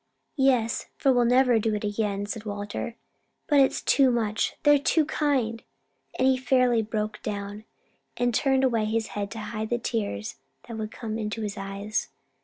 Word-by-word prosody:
"Yes; 250 -4 +2
for 270 - +3
we'll 245 -1 +3
never 250 -1 +4
do 220 0 0
it 210 - -4
again," 205 -1 -1
said 210 +1 -5
Walter. 205 +2 -5 0.5
"But 290 -2 +4
it's 270 - +3
too 270 -2 +4
much: 225 -3 0
they're 290 -1 +6
too 310 +2 +2
kind!" 270 -7 0 0.6
and 260 - +3
he 260 -1 +4
fairly 255 -2 +3
broke 215 0 -3
down, 205 0 -5 0.5
and 245 0 +1
turned 265 +2 +2
away 230 -4 +2
his 220 0 -1
head 200 -1 -4
to 225 - -8
hide 215 0 -4
the 240 - +1
tears 205 - -3 0.3
that 230 - -6
would 215 -1 -3
come 225 -1 -5
into 215 +1 -3
his 205 -1 -3
eyes. 200 +1 -3
225 Hz, 175 wpm, -26 LUFS, 210-255 Hz, 0.6 s, they're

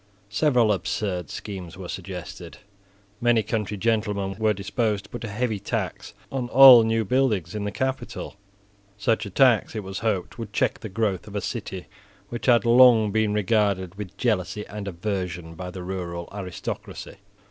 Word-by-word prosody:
Several 120 -4 +3
absurd 95 -3 -3
schemes 95 -5 -7
were 95 -2 -7
suggested. 90 -1 -7 0.6
Many 120 -2 +3
country 105 -1 -2
gentlemen 105 -2 0
were 110 -1 +3
disposed 105 +1 -1
to 95 - -17
put - - -6
a - - -3
heavy 110 0 -2
tax 100 - -4 0.2
on 125 -3 -3
all 130 -2 +10
new 115 0 +1
buildings 105 -7 +1
in 105 -1 -3
the 105 - -2
capital. 130 -2 -4 0.6
Such 110 +1 0
a - - -6
tax, 115 +1 +3
it 110 - -3
was 95 0 -5
hoped, 105 -1 -2
would 110 -3 -6
check - - +1
the 110 - -7
growth 105 -1 -1
of 105 - -9
a - - +1
city 95 -4 -5 0.4
which 120 +1 -5
had 120 -3 +5
long 120 -3 +6
been 110 0 +1
regarded 100 -3 +1
with 100 -2 -8
jealousy 105 -3 -1
and 105 -1 -7
aversion 90 -3 -4
by 90 +2 -7
the 90 0 -7
rural 85 -2 -5
aristocracy. 100 0 -6
105 Hz, 165 wpm, -25 LUFS, 95-115 Hz, 0.6 s, all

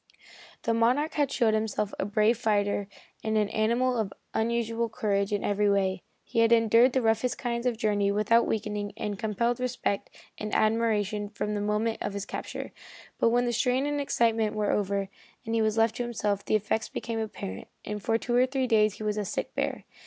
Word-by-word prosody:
The 230 - +1
Monarch 250 +7 +2
had 290 -2 +1
shown 230 -5 +2
himself 215 -1 -1
a - - 0
brave 215 +3 +3
fighter 205 -3 0 0.4
and 220 0 0
an 210 -1 +2
animal 235 +4 +1
of 205 -3 -1 0.2
unusual 230 0 0
courage 200 -2 0
in 205 - -1
every 205 0 +2
way. 190 -2 +1 0.2
He - - -2
had 230 0 +4
endured 230 +2 +5
the 260 - +1
roughest 225 +2 +1
kind 235 -1 -2
of 245 - +1
a - - -18
journey 205 -3 +1
without 215 +3 +3
weakening, 210 -1 -2
and 205 -3 -4
compelled 235 +3 0
respect 250 -5 -2 0.3
and 210 0 -3
admiration 215 -2 +1
from 210 0 -3
the 205 - -1
moment 210 +2 0
of 205 - -2
his 200 -1 -4
capture. - - -6 0.5
But - - +4
when 245 +1 +2
the 240 - 0
strain 250 +3 +1
and 290 0 -1
excitement 225 -5 +1
were 210 -1 +1
over, 200 -1 0 0.4
and 225 - -3
he 225 - +2
was 215 0 +1
left 225 0 +2
to 245 - -1
himself, 210 -4 -1
the - - +1
effects 215 +1 0
became 230 -1 -4
apparent, 185 - -5 0.2
and 210 0 -4
for 225 +4 +1
two 240 +1 -2
or 250 +1 +5
three 265 0 0
days 215 -3 +3
he - - -8
was 210 0 -1
a 210 - 0
sick 195 - -4
bear. - - -2
220 Hz, 205 wpm, -28 LUFS, 210-235 Hz, 0.5 s, endured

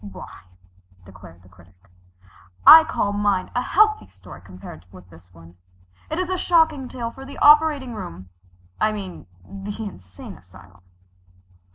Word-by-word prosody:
"Why," 100 -2 -12 0.6
declared 95 -2 -16
the 90 - -20
Critic, 90 0 -22 0.9
"I 320 0 +10
call 205 -9 -2
mine 205 -2 -1
a 245 - -1
healthy 430 +9 +1
story 95 -3 -15
compared 90 -3 -13
with 90 -1 -16
this 85 +2 -19
one. 85 0 -18 0.5
It 315 - -4
is 370 -1 -2
a 370 - -2
shocking 320 -7 +1
tale 235 -2 -6
for 265 - -13
the 275 +1 -11
operating 295 -4 +4
room 175 - -9 0.5
I 215 - +1
mean 190 - -9 0.2
the 200 +1 -8
insane 90 - -11
asylum." 90 +1 -19
195 Hz, 145 wpm, -21 LUFS, -, 0.9 s, I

